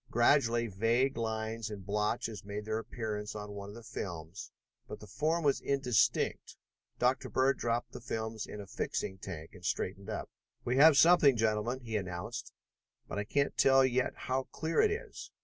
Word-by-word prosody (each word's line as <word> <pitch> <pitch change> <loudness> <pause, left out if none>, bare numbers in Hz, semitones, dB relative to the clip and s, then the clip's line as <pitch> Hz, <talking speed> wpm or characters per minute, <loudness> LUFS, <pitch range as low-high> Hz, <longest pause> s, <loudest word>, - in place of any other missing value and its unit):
Gradually 120 -1 +3
vague 115 +6 +1
lines 110 0 -3
and 100 -3 -8
blotches 105 +2 -1
made 105 +1 -5
their 110 0 -1
appearance 110 -2 -5
on 105 -1 -6
one 100 0 -7
of 105 - -10
the 115 - -10
films, 85 -3 -6 0.4
but - - -7
the - - -11
form 160 +3 0
was 140 -2 +2
indistinct. 135 -5 +1 0.4
Dr. 130 +1 +1
Bird 135 +1 +2
dropped 120 0 -1
the 125 - -9
films 110 -2 -4
in 105 - -8
a 100 - -7
fixing 95 0 -3
tank 80 -4 -7
and 90 - -14
straightened 95 +4 -2
up. 110 - -4 0.4
"We 125 +2 +1
have 150 0 +8
something, 155 -6 +6
gentlemen," 110 +3 0
he 115 -3 -2
announced, 95 +5 -5 0.6
"but 100 - -4
I 105 - -2
can't 140 +6 0
tell 135 0 +5
yet 130 0 +1
how 130 +1 -2
clear 160 +1 +1
it 435 - +4
is. 425 +3 -5
115 Hz, 175 wpm, -32 LUFS, 105-130 Hz, 0.6 s, have